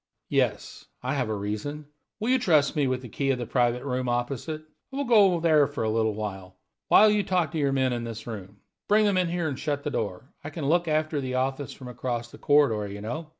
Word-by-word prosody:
"Yes, - - -1 0.2
I - - -1
have 125 -5 -1
a 110 - -1
reason. 105 +9 -4 0.3
Will 220 +3 -1
you 260 - +4
trust 155 - +3
me 145 -3 +2
with 130 0 -1
the - - -7
'key' 135 +5 -2
of 135 - +2
the 120 - -4
private 120 +1 +1
room 130 -2 -2
opposite? 135 +6 -2 0.3
I - - -8
will 285 - 0
go 225 -5 +6
over 170 -2 -1
there 155 -4 +4
for 145 -4 -4
a 110 - +1
little, 110 -1 +1
while 105 - +1
you 210 0 +2
talk 180 -6 0
to 160 - -2
your 140 -2 +2
men 130 -2 +1
in 120 -1 -3
this 115 -2 -6
room. 100 -3 -8 0.3
Bring 210 +1 +4
them 200 -2 +2
in 180 -2 +2
here 170 -1 -1
and 140 -3 -4
shut 145 -2 -2
the 150 - -2
door; 100 +1 -4
I 145 - -5
can 155 -1 -5
look 170 +4 +2
after 155 -1 0
the 130 -1 -3
office 135 +2 -1
from 130 - -10
across 120 -1 -4
the - - -13
corridor, 130 -8 +3
you 100 - -7
know. 150 +9 -5
135 Hz, 240 wpm, -26 LUFS, 120-155 Hz, 0.3 s, go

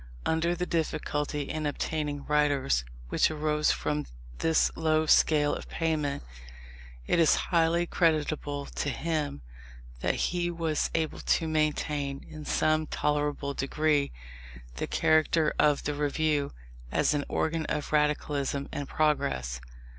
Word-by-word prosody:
Under 165 +2 +1
the 180 +1 -2
difficulty 150 -3 -1
in 155 +1 -3
obtaining 145 -1 -3
writers, 145 - +2 0.3
which - - +3
arose 150 -1 +1
from 150 0 -2 0.3
this 160 -1 +3
low 155 -1 +2
scale 150 -1 +4
of - - -6
payment, 155 - -1 0.8
it - - +2
is 165 - +5 0.2
highly 170 +1 +3
creditable 150 -4 0
to 145 - -3
him 150 - -2 0.6
that - - 0
he 175 -1 0
was 165 -3 -1
able 160 -1 -1
to 165 - +1
maintain, 150 -2 -1
in 155 -1 -9
some 155 +1 +1
tolerable 145 -1 -1
degree, 145 +1 +1 0.7
the - - -2
character 155 0 +3
of 150 -1 +3
the 150 - -1
Review 145 0 0 0.4
as - - +2
an 145 -1 0
organ 160 0 -1
of 150 -1 -3
radicalism 145 -2 0
and 145 - -5
progress. 65 - 0
150 Hz, 125 wpm, -28 LUFS, 145-160 Hz, 0.8 s, is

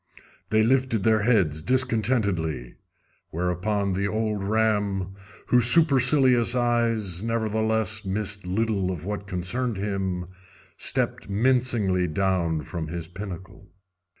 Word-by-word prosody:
They 110 0 +3
lifted 130 -3 +1
their 110 0 +3
heads 95 -10 +2
discontentedly, 105 - 0 0.6
whereupon 95 +4 -1
the 100 +2 -1
old 110 -1 -2
ram, 105 -3 0 0.4
whose 125 -2 +5
supercilious 130 -5 +4
eyes 115 -7 0
nevertheless 110 -1 -1
missed 100 -1 -3
little 100 -1 0
of 90 -3 -5
what 100 0 -5
concerned 100 +6 -2
him, 95 -3 -2 0.5
stepped - - -2
mincingly 110 -5 +1
down 85 -2 0
from 80 +3 -5
his 85 0 -5
pinnacle. 95 -1 -9
105 Hz, 105 wpm, -25 LUFS, 90-115 Hz, 0.6 s, whose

